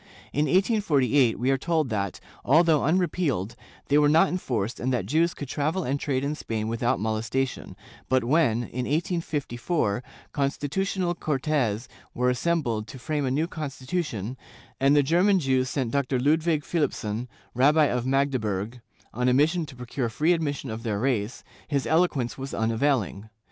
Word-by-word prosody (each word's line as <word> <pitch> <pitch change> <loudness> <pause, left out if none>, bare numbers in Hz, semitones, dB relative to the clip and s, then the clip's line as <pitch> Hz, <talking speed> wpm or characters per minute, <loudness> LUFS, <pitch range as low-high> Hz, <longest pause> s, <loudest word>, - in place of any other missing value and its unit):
In 150 +2 +2
1848 145 - +2
we 130 +3 +1
are 135 - +1
told 160 -2 0
that, 100 -4 -2 0.2
although 155 +2 +4
unrepealed, 155 - 0 0.3
they 145 +1 +4
were 145 0 +4
not 165 +5 +5
enforced 120 - -2
and 130 +2 -1
that 125 - 0
Jews 165 +3 +1
could 145 - -6
travel 155 +7 -1
and 140 +1 -1
trade 135 -3 -1
in 145 +1 -1
Spain 110 -7 -3
without 115 +1 0
molestation,^ 110 +5 -2 0.3
but 130 -1 +3
when, 120 -3 +2
in 125 +1 -4
1854, 150 - -1 0.3
Constitutional 175 +6 -1
Cortes 135 -8 -1 0.3
were 125 +1 +2
assembled 125 -6 -1
to 130 - -9
frame 145 +3 -2
a - - 0
new 145 +5 +1
con 155 -4 -5
stitution, 130 - -4 0.4
and 135 +2 +4
the 145 - +5
German 180 +7 +3
Jews 130 -4 +1
sent 130 -5 -2
Dr. 135 -1 0
Ludwig 155 +3 +2
Philipson, 120 -8 -2 0.3
Rabbi 150 +5 +4
of 125 -2 -1
Magdeburg, 125 -5 -1 0.3
on 125 +2 +1
a 125 - +3
mission 160 +4 +2
to 140 - -11
procure 125 0 -3
free 155 +10 +2
admission 145 -6 -2
of 110 +1 -5
their 110 -3 -2
race, 115 -1 -1 0.2
his 140 -2 -1
eloquence 155 -7 +1
was 135 +1 -5
unavailing. 115 -3 0
135 Hz, 160 wpm, -26 LUFS, 120-155 Hz, 0.4 s, not